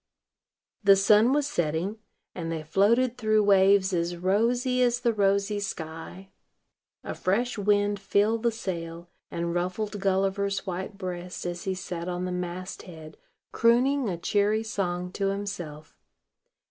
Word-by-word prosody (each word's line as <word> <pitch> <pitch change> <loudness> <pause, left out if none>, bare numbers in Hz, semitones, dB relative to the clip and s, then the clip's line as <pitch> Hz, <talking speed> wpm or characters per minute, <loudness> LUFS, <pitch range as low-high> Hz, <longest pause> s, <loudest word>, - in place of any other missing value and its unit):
The 200 -1 +7
sun 210 +5 +5
was 290 0 +2
setting; 175 - -2 0.3
and 165 -2 -4
they 160 -1 -3
floated 235 +9 +2
through 215 -2 +3
waves 195 -1 +4
as 175 0 -1
rosy 240 +8 +1
as 245 0 +2
the 235 -2 +2
rosy 200 0 +1
sky. 175 0 -7 0.7
A - - -4
fresh 240 +7 0
wind 205 0 +1
filled 205 +3 +1
the 235 0 +2
sail, 170 -5 -6 0.2
and 170 0 -3
ruffled 185 +4 -2
Gulliver's 195 +1 0
white 190 +2 -5
breast 180 -2 -6
as 175 0 -4
he 190 -1 -1
sat 180 -1 -5
on 180 0 -3
the 180 - -3
mast 180 +1 -5
head 160 -3 -11 0.4
crooning 250 +2 +3
a 175 - -3
cheery 205 +5 +1
song 180 -4 -3
to 195 +1 -1
himself. 180 -7 -5
195 Hz, 140 wpm, -27 LUFS, 175-215 Hz, 0.7 s, The